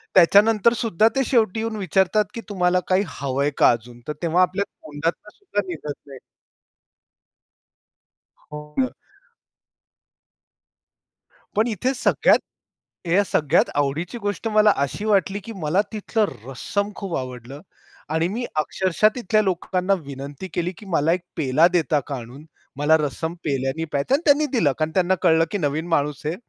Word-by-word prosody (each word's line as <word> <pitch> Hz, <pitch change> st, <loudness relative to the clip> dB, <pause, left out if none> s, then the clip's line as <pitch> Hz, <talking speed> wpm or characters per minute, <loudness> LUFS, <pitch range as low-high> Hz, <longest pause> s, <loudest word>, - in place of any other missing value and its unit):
त्याच्यानंतर 210 Hz, +5 st, +5 dB
सुद्धा 220 Hz, -2 st, +2 dB
ते 270 Hz, -, +2 dB
शेवटी 225 Hz, -5 st, +2 dB
येऊन 225 Hz, 0 st, -3 dB
विचारतात, 190 Hz, +2 st, +2 dB
की 230 Hz, -, -6 dB
तुम्हाला 180 Hz, -2 st, +2 dB
काही 190 Hz, +2 st, +3 dB, 0.2 s
हवंय 140 Hz, +1 st, 0 dB
का -, -, +6 dB
अजून? 120 Hz, +1 st, -5 dB
तर 150 Hz, -, -2 dB
तेव्हा 170 Hz, +2 st, +2 dB
आपल्या 185 Hz, +2 st, +1 dB
तोंडातून 160 Hz, +7 st, -4 dB
सुद्धा 285 Hz, -, -2 dB
निघत 150 Hz, -4 st, -5 dB
नाही. 135 Hz, -2 st, -10 dB, 2.3 s
हो 150 Hz, 0 st, -6 dB, 0.2 s
ना. 255 Hz, -, +2 dB, 2.7 s
पण 220 Hz, +3 st, +3 dB
इथे 240 Hz, +5 st, -1 dB
सगळ्यात 255 Hz, -, +3 dB, 0.7 s
या 190 Hz, +5 st, +3 dB
सगळ्यात 150 Hz, -6 st, +2 dB
आवडीची 145 Hz, -, -1 dB
गोष्ट 205 Hz, +2 st, -3 dB
मला 215 Hz, -1 st, +5 dB
अशी 140 Hz, +10 st, -2 dB
वाटली, 200 Hz, -1 st, +1 dB
की 225 Hz, +3 st, -9 dB
मला 175 Hz, +3 st, +1 dB
तिथलं 215 Hz, +1 st, 0 dB, 0.2 s
रस्सम 200 Hz, +10 st, -2 dB
खूप 195 Hz, -4 st, -4 dB
आवडलं 130 Hz, +2 st, -7 dB, 0.5 s
आणि 160 Hz, +1 st, +1 dB
मी 235 Hz, +6 st, -3 dB
अक्षरशः 185 Hz, +6 st, +2 dB
तिथल्या 215 Hz, -3 st, +1 dB
लोकांना 185 Hz, 0 st, 0 dB
विनंती 140 Hz, +5 st, -7 dB
केली, 175 Hz, +1 st, -1 dB
की 210 Hz, -, -13 dB
मला 165 Hz, -2 st, +1 dB
1 180 Hz, -, -2 dB, 0.2 s
पेला 155 Hz, +3 st, +4 dB
देता 160 Hz, -3 st, +2 dB
का 140 Hz, -, -3 dB
आणून? 125 Hz, +6 st, -10 dB, 0.3 s
मला 155 Hz, +2 st, +4 dB
रस्सम 160 Hz, +3 st, -3 dB
पेल्याने 135 Hz, +3 st, -1 dB
प्यायचं 140 Hz, -, 0 dB
आणि 305 Hz, -, -1 dB
त्यांनी 295 Hz, +1 st, +5 dB
दिलं. 160 Hz, -, +3 dB
कारण 155 Hz, 0 st, 0 dB
त्यांना 185 Hz, 0 st, +3 dB
कळलं, 165 Hz, -1 st, +4 dB
की 205 Hz, -, -1 dB
नवीन 155 Hz, +1 st, -2 dB
माणूस 150 Hz, -2 st, -1 dB
आहे. 160 Hz, +3 st, -1 dB
175 Hz, 145 wpm, -22 LUFS, 150-205 Hz, 2.7 s, का